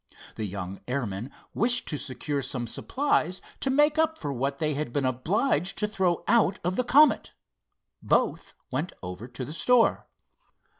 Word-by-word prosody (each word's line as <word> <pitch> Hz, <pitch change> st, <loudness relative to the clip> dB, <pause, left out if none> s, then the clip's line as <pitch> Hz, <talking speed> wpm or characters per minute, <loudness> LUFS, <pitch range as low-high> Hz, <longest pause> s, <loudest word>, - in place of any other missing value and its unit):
The 110 Hz, -, -3 dB
young 95 Hz, 0 st, -6 dB
airman 120 Hz, -3 st, -3 dB, 0.2 s
wished 245 Hz, +2 st, +2 dB
to 150 Hz, -, -1 dB
secure 140 Hz, +2 st, -3 dB
some 125 Hz, -2 st, -3 dB
supplies 185 Hz, -, 0 dB, 0.2 s
to 270 Hz, -, 0 dB
make 295 Hz, +3 st, +3 dB
up 320 Hz, 0 st, +2 dB
for 145 Hz, -2 st, -4 dB
what 135 Hz, +2 st, -2 dB
they 155 Hz, 0 st, 0 dB
had 145 Hz, -3 st, -3 dB
been 140 Hz, +1 st, 0 dB
obliged 175 Hz, -, +1 dB
to 210 Hz, -, +3 dB
throw 185 Hz, -5 st, 0 dB
out 215 Hz, -5 st, +3 dB
of 180 Hz, +2 st, 0 dB
the 250 Hz, -, +1 dB
Comet. 290 Hz, +5 st, +4 dB, 0.7 s
Both -, -, 0 dB, 0.2 s
went 150 Hz, +8 st, -2 dB
over 90 Hz, +6 st, -6 dB
to 125 Hz, +1 st, -6 dB
the 150 Hz, -, -7 dB
store. 245 Hz, +7 st, +3 dB
155 Hz, 160 wpm, -27 LUFS, -, 0.7 s, Comet